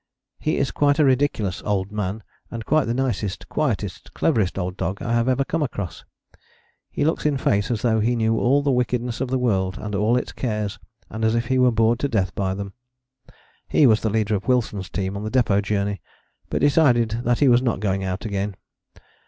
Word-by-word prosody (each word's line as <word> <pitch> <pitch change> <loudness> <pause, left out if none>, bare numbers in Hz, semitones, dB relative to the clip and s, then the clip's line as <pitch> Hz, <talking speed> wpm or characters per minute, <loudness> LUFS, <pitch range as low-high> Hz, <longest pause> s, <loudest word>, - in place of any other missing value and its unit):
"He 155 - 0
is 140 - 0
quite 145 0 +2
a 155 - +4
ridiculous 130 -8 +1
'old 100 -1 -1
man,' 105 0 -3 0.3
and 115 -1 -6
quite 155 -2 +2
the 115 - -1
nicest, 115 -7 -2
quietest, 110 -10 -3
cleverest 110 - +1
old 90 -1 -3
dog 95 +3 -3
I 120 - -2
have 120 +2 +2
ever 135 +1 +1
come 165 +3 -2
across. 100 - -4 0.8
He 145 - -1
looks 160 - 0
in 150 -2 +1
face 100 -5 +1
as 115 -4 -2
though 110 -2 +2
he 120 +3 +1
knew 115 -1 +1
all 140 +4 +3
the 140 - +2
wickedness 125 -1 -1
of 130 - -1
all - - -3
the - - +3
world 95 -7 0
and 105 +1 -6
all 105 +5 +2
its - - -3
cares, 105 -4 -3 0.3
and 110 0 -5
as 110 +1 +2
if 120 +1 -1
he 130 - +2
were 125 0 +5
bored 115 +1 +2
to 140 - 0
death 95 -9 0
by 95 -1 -1
them." 100 0 -6 0.9
He 150 - +4
was 110 -4 +4
the 110 - 0
leader 110 0 0
of 100 +3 -2
Wilson's 110 -7 0
team 95 +2 -3
on 100 - -5
the 110 - -3
Depôt 110 -5 +2
Journey, 100 -1 -2 0.5
but - - -1
decided 120 -6 +3
that 120 0 +2
he 145 - +3
was 120 -1 +5
not 120 -6 0
going 95 -1 -1
out 95 +3 -3
again. 100 -1 -2
110 Hz, 215 wpm, -23 LUFS, 100-125 Hz, 0.9 s, were